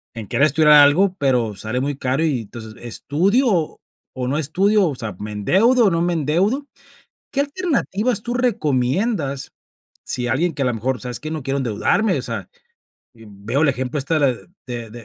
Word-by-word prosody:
en 110 -3 -7
querer 140 - +3
estudiar 150 +1 +5
algo, 150 +7 +6
pero 125 -6 +1
sale 110 +5 -3
muy 140 +1 -2
caro 135 +5 0
y, 140 -7 0
entonces, 110 0 -10
¿estudio 175 - 0 0.4
o 125 -1 -3
no 140 +4 0
estudio, 190 +7 +2
o 145 - -2
sea, 110 -6 -6
me 105 +1 -6
endeudo 215 - +3
o - - +5
no 165 0 +1
me 175 0 +1
endeudo? 185 - 0 0.7
¿Qué 280 - 0
alternativas 275 - -1
tú 240 +1 -4
recomiendas? 155 - 0 0.5
Si 125 -1 -2
alguien 165 +7 +1
que 140 - -7
a - - +1
lo 125 - 0
mejor, 125 +2 -2
¿sabes 125 0 -5
qué? 155 - -6
No 155 -3 -4
quiero 135 +1 -2
endeudarme, 135 - +1
o - - -4
sea, - - -5 0.6
veo 115 +5 -4
el 155 - +4
ejemplo 130 +2 -3
esta 155 +4 0
de 135 -2 0 0.2
de 120 -3 -6
145 Hz, 180 wpm, -20 LUFS, 125-190 Hz, 0.7 s, algo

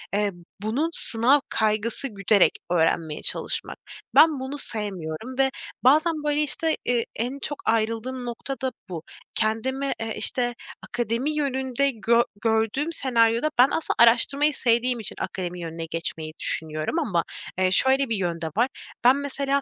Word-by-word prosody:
eee, 205 0 +1 0.3
bunun 245 +10 0
sınav 245 +3 +3
kaygısı 220 +4 0
güderek 200 -3 +3 0.2
öğrenmeye 160 -2 +1
çalışmak. - - -2 0.4
Ben 315 -4 +6
bunu 265 +2 -5
sevmiyorum 205 - -3
ve, 270 0 +4 0.3
bazen, 310 +6 +5
böyle, 295 0 +1
işte, 320 +2 +1
eee, 240 -2 +1
en 250 +5 -3
çok 290 +1 -4
ayrıldığım 230 +3 -1
nokta 240 +3 -5
da 260 -1 -1 0.2
bu. 165 -3 -5 0.3
Kendime, 260 +5 0
eee, 225 -1 -3
işte, 245 -1 +1 0.3
akademi 240 +5 -1
yönünde 270 -1 0
gö 235 0 +3 0.2
gördüğüm 225 +8 +1
senaryoda, 235 -1 +2
ben 250 +2 +7
aslında 325 - -1
araştırmayı 275 +6 +5
sevdiğim 245 -1 +1
için 220 - -6
akademi 180 -1 -4
yönüne 165 0 -5
geçmeyi 160 -1 -5
düşünüyorum, 155 - -1
ama, 190 - 0 0.3
eee, 185 0 +2
şöyle 265 +6 +3
bir 225 - +1
yön 175 -4 -2
de 160 - -2
var. 240 +3 +4 0.4
Ben 250 +2 +7
mesela 280 0 -1
235 Hz, 145 wpm, -25 LUFS, 210-270 Hz, 0.4 s, ben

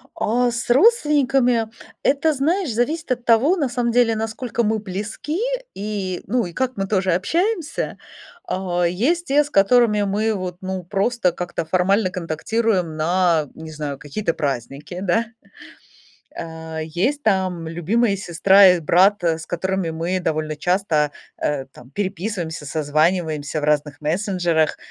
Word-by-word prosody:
А, 245 +3 +1
с 235 +1 -4
родственниками- 270 - +3 0.4
это, 295 +3 +2
знаешь, 315 +4 0
зависит 290 +8 -1
от 245 -1 -4
того, 245 +11 +4
на 290 -7 0
самом 240 -1 -1
деле, 235 -1 +3
насколько 225 +2 -2
мы 220 0 +1
близки 210 - -4 0.3
и, 195 -3 -4
ну, 235 +1 0
и 175 - -8
как 255 +5 -2
мы 195 -1 -1
тоже 190 -2 +1
общаемся. 335 - -1 0.5
А, 180 -2 -1
есть 255 - +1
те, 290 +2 +3
с 290 - -10
которыми 210 0 +4
мы 210 +2 0
вот, 185 -3 -4
ну, 190 -1 -4
просто 195 +1 0
как-то 175 -1 -4
формально 185 +4 +2
контактируем 180 +1 -1
на, 165 -1 +2
не 160 0 -9
знаю, 150 -3 -5
какие-то 165 +6 -3
праздники, 140 +5 -4
да. 210 +5 +1 1.1
Э, 160 -1 -6
есть 195 - -1
там 185 -5 0
любимые 200 +7 +1
сестра 190 +2 +5
и 180 -1 +5
брат, 185 +6 +4
с 165 -1 0
которыми 185 0 -2
мы 165 +3 -2
довольно 155 -2 -2
часто, 160 -3 +1 0.3
э, 140 -2 -2
там, 125 -2 -16
переписываемся, 185 -3 -3
созваниваемся 155 +1 0
в - - -6
разных 150 -1 0
мессенджерах, 170 -1 0
190 Hz, 140 wpm, -21 LUFS, 165-235 Hz, 1.1 s, сестра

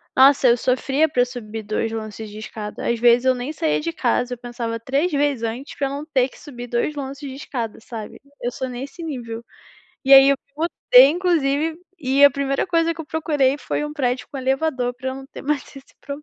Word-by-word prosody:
nossa, 270 0 +6
eu 235 - +6
sofria 270 +5 +1
pra 245 -3 +2
subir 225 -3 -7
2 215 +2 -2
lances 220 -1 -6
de 210 - -10
escada, 215 -2 -6
às 235 -1 0
vezes 240 +1 +5
eu 260 - +5
nem 250 +3 -4
saía 315 0 0
de 335 +2 -2
casa, 250 -4 0
eu - - -20
pensava 235 -1 -5
3 275 +9 0
vezes 285 -4 +1
antes 235 +5 -4
pra 275 - -1
eu - - -5
não 285 +2 -5
ter 265 -5 +1
que - - -17
subir 245 -5 -9
2 240 +5 -1
lances 280 +1 -6
de 265 - -7
escada, 235 -6 -5
sabe? 220 -2 -8 0.2
Eu 245 - -2
sou 260 +1 -4
nesse 270 +6 -7
nível. 235 -7 -5 0.6
E 270 - +4
aí 270 0 +10
eu 280 - +3 0.2
botei 300 -5 +6
inclusive 320 -3 +1 0.2
e 275 0 +4
a 285 - +9
primeira 275 +2 -1
coisa 335 -2 +2
que 325 - -8
eu 320 - -7
procurei 295 -4 +1
foi 295 - -2
um 295 - -5
prédio 250 -4 -1
com 285 - -7
elevador 265 -1 0
pra 260 +1 -5
eu - - -5
não 270 0 -9
ter - - -10
mais 290 -1 0
esse 275 0 -14
problema. 285 +1 -7
265 Hz, 220 wpm, -22 LUFS, 245-290 Hz, 0.6 s, aí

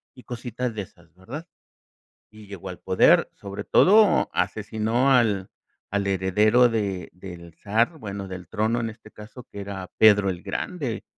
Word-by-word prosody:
y 125 - -15
cositas 120 0 -5
de 105 - -3
esas, 85 -2 -20
¿verdad? 135 - -9 0.8
Y 105 -1 -14
llegó 95 -1 -8
al 90 - -8
poder. - - +4
Sobre 100 0 -8
todo, 210 +2 +5
asesinó 110 +5 0
al 105 -6 +2 0.4
al 100 0 -1
heredero 105 +6 +3
de 100 -5 -3
del 85 -2 -11
zar. 115 - 0
Bueno, 100 -3 -6
del 90 -2 -8
trono, 110 +3 0
en 115 - -2
este 110 +1 -16
caso, 105 +4 -12
que 100 - -7
era 95 -2 -7
Pedro 105 -2 +5
el 90 -1 -5
Grande, 125 - -4
105 Hz, 155 wpm, -24 LUFS, 95-120 Hz, 0.8 s, todo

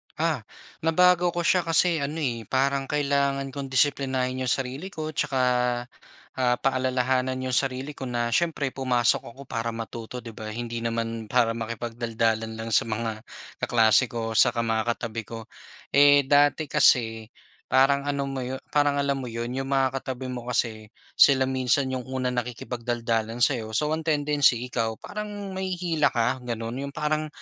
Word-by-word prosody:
Ah, 155 -8 -1 0.3
nabago 175 +2 +3
ko 175 - 0
siya 175 0 +2
kasi 165 0 +3
ano, 140 +2 -3
eh, 115 -5 -3
parang 135 +1 0
kailangan 140 -2 0
kong 140 -1 -5
disiplinahin 130 -2 +1
'yung - - -3
sarili 135 +7 -2
ko 155 -5 -5
tsaka, 140 -3 -1 1.0
ah, 125 -1 +3
paalalahanan 130 0 +1
'yung 130 - -2
sarili 135 +2 0
ko 135 -3 -7
na 120 -1 -1
siyempre, 150 -2 0
pumasok 125 -3 +1
ako 135 - -12
para 115 -2 -4
matuto, 115 +2 -7
'di 115 - -8
ba? 110 0 -8
Hindi 115 +1 -4
naman 115 -1 -3
para 115 0 +2
makipagdaldalan 115 -1 -2
lang 115 0 -6
sa 110 - +3
mga 110 0 -3 0.4
kaklase 115 +1 +4
ko, 115 -1 -4
tsaka 115 +1 +3
mga 115 +1 0
katabi 115 0 -5
ko. 115 -1 -7 0.5
Eh, 145 0 +6
dati 145 +2 +3
kasi 115 -2 +4 0.4
parang 140 +2 +3
ano 140 -1 0
mo 135 -1 -4
'yon 130 +1 -5
parang 145 -1 +3
alam 140 -1 0
mo 130 - -5
'yon, 115 +1 -4
'yung 135 +1 -3
mga 135 -1 +1
katabi 130 0 -5
mo 125 -1 -6
kasi, 110 -3 -1 0.3
sila 135 -2 +7
minsan 130 +1 +1
'yung 130 -1 -4
unang 130 -1 -1
nakikipagdaldalan 120 -1 -2
sa'yo, 110 -5 0
so 150 +5 +1
ang 160 +1 -3
tendency 145 -5 +3
ikaw, 110 -1 -1
parang 205 - -6
mahihila 180 -5 0
ka, 120 +1 0
gano'n. 115 +2 -4
'Yung 140 - -10
parang 155 0 -1
130 Hz, 160 wpm, -25 LUFS, 115-140 Hz, 1.0 s, sila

